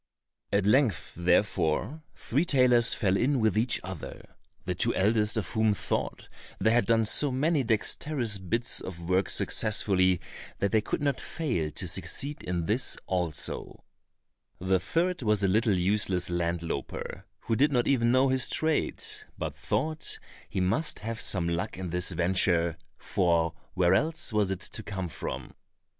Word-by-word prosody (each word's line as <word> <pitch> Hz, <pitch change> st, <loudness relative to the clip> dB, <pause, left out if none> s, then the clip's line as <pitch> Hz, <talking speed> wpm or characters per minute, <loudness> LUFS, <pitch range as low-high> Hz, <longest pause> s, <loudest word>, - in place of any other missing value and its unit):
At 100 Hz, -1 st, +1 dB
length, 110 Hz, -, +2 dB
therefore, 90 Hz, -, 0 dB
three 140 Hz, +7 st, -1 dB
tailors 125 Hz, -7 st, +4 dB
fell 95 Hz, -2 st, +1 dB
in 130 Hz, +6 st, +1 dB
with 110 Hz, -3 st, +1 dB
each 115 Hz, +3 st, +2 dB
other, 95 Hz, -4 st, -9 dB, 0.3 s
the -, -, -1 dB
two -, -, +2 dB
eldest 105 Hz, +2 st, +2 dB
of 105 Hz, -, -2 dB
whom 110 Hz, -2 st, +1 dB
thought -, -, -3 dB, 0.3 s
they 110 Hz, -, +2 dB
had 120 Hz, +1 st, +2 dB
done 115 Hz, -1 st, +3 dB
so 140 Hz, +6 st, +4 dB
many 150 Hz, +4 st, +1 dB
dexterous 115 Hz, 0 st, 0 dB
bits 115 Hz, +6 st, -2 dB
of 85 Hz, -2 st, -8 dB
work 95 Hz, 0 st, +1 dB
successfully 95 Hz, -4 st, +3 dB, 0.4 s
that 100 Hz, -, -1 dB
they 110 Hz, -, +3 dB
could 125 Hz, -, -3 dB
not 140 Hz, -2 st, 0 dB
fail 120 Hz, -, -2 dB
to -, -, -3 dB
succeed 145 Hz, +2 st, -1 dB
in 90 Hz, -2 st, -3 dB
this 110 Hz, +7 st, -1 dB
also; 90 Hz, -6 st, -3 dB, 0.7 s
the 95 Hz, +1 st, +1 dB
third 170 Hz, -, -1 dB
was 105 Hz, -3 st, +1 dB
a -, -, +4 dB
little 105 Hz, +1 st, +2 dB
useless 90 Hz, -1 st, +1 dB
land 85 Hz, -1 st, -1 dB
louper, 80 Hz, -4 st, -5 dB, 0.2 s
who 115 Hz, -, -1 dB
did 145 Hz, +6 st, +3 dB
not 125 Hz, -3 st, +1 dB
even 120 Hz, -4 st, +2 dB
know 130 Hz, +2 st, +3 dB
his 130 Hz, -1 st, +2 dB
trade, 160 Hz, 0 st, 0 dB, 0.3 s
but -, -, -4 dB
thought 155 Hz, 0 st, -2 dB, 0.3 s
he 100 Hz, -, -3 dB
must 95 Hz, -, 0 dB
have 110 Hz, +1 st, -5 dB
some 90 Hz, -4 st, +2 dB
luck 85 Hz, +1 st, -3 dB
in 95 Hz, -2 st, -5 dB
this 90 Hz, +1 st, -2 dB
venture, 85 Hz, -1 st, +1 dB, 0.2 s
for 85 Hz, -3 st, 0 dB, 0.2 s
where 90 Hz, -1 st, +3 dB
else 155 Hz, -, +1 dB
was 105 Hz, -2 st, +2 dB
it 95 Hz, 0 st, -3 dB
to -, -, -5 dB
come 95 Hz, -4 st, -5 dB
from? 80 Hz, -, -6 dB
105 Hz, 160 wpm, -28 LUFS, 90-125 Hz, 0.7 s, tailors